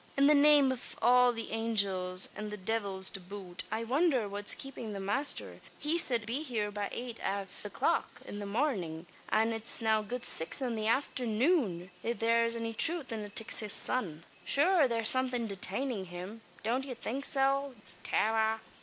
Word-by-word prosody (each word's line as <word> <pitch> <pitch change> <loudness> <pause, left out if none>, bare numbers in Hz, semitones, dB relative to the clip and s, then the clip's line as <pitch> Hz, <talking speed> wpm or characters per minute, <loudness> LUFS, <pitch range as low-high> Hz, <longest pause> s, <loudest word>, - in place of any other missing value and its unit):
"In 275 - +4
the 295 - +5
name 290 -2 +5
av 255 -2 -7
all 250 +1 +4
the 230 -1 -7
angels, 200 -5 +2
an 210 0 -6
the 210 - -7
divils 195 -2 -1
to 195 - -6
boot, 185 -1 -8
I 225 +1 -3
wondher 260 -2 0
what's 205 +1 +3
kapin' 245 -5 -8
the 200 - -6
masther! 205 +10 0 0.2
He 315 +3 +1
sid 240 -7 +2
he - - -12
wud - - -12
be 240 +7 -3
heeur 220 -7 -3
by 205 0 -4
eight 240 -1 -7
av 195 0 -5
the - - -7
clock - - -2
in 205 - -8
the 205 - -6
marnin', 200 - -3 0.2
and 225 +1 +1
it's 225 0 0
now 220 -2 +1
good 240 +3 -5
six 160 - +2
in 255 -3 -2
the 215 -1 -3
afthernoon, 230 - -1
if 235 +1 -3
thare's 230 0 +1
any 230 0 -4
truth 320 +3 +3
in 225 - -4
a 205 - -9
Tixas 215 -1 +4
sun. 170 -11 +3 0.2
Shure 320 0 +2
thare's 230 -2 +4
somethin' 255 -2 +1
detainin' 200 +2 -4
him? 180 +6 -9 0.2
Don't 240 +5 -1
yez 260 -3 -8
think 270 +5 -5
so, 275 -1 +3 0.3
Tara?" 220 0 0
225 Hz, 185 wpm, -30 LUFS, 205-260 Hz, 0.3 s, the